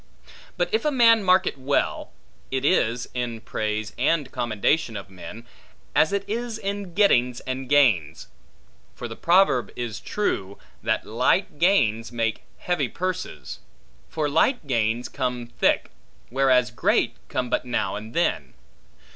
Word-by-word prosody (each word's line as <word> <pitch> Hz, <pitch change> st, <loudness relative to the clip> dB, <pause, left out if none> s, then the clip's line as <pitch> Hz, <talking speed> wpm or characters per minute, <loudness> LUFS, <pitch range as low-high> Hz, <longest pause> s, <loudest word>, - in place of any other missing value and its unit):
But -, -, -1 dB
if 445 Hz, -, +2 dB
a 300 Hz, -, +2 dB
man 230 Hz, -5 st, +5 dB
mark 185 Hz, 0 st, +4 dB
it 140 Hz, -, -3 dB
well, 140 Hz, +2 st, -1 dB, 0.4 s
it 135 Hz, +1 st, -2 dB
is, 125 Hz, -7 st, +2 dB
in 120 Hz, -2 st, -3 dB
praise 110 Hz, -1 st, -3 dB
and 145 Hz, +1 st, +1 dB
commendation 120 Hz, +1 st, 0 dB
of 100 Hz, -1 st, -9 dB
men, 105 Hz, +5 st, -10 dB, 0.5 s
as 155 Hz, -, +3 dB
it 200 Hz, 0 st, -2 dB
is 230 Hz, +1 st, -3 dB
in 200 Hz, -4 st, -5 dB
gettings 125 Hz, -, +3 dB
and 130 Hz, 0 st, -4 dB
gains: 105 Hz, -, +3 dB, 0.7 s
for 120 Hz, -, -6 dB
the 115 Hz, -, -8 dB
proverb 170 Hz, -7 st, +3 dB
is 120 Hz, -4 st, -4 dB
true, 100 Hz, -, -2 dB, 0.2 s
That -, -, -1 dB
light 145 Hz, -, +1 dB
gains 115 Hz, -, +2 dB
make 115 Hz, -2 st, -1 dB, 0.2 s
heavy 180 Hz, -1 st, -1 dB
purses; 185 Hz, 0 st, -5 dB, 0.5 s
for 155 Hz, -2 st, -1 dB
light 165 Hz, -, +2 dB
gains 120 Hz, -2 st, 0 dB
come 125 Hz, -3 st, -3 dB
thick, -, -, +2 dB, 0.4 s
whereas 130 Hz, -2 st, +3 dB
great, 120 Hz, -, +1 dB
come 125 Hz, -1 st, -2 dB
but -, -, +1 dB
now 120 Hz, -, -1 dB
and 110 Hz, +2 st, -8 dB
then. -, -, 0 dB
130 Hz, 140 wpm, -24 LUFS, 115-180 Hz, 0.7 s, man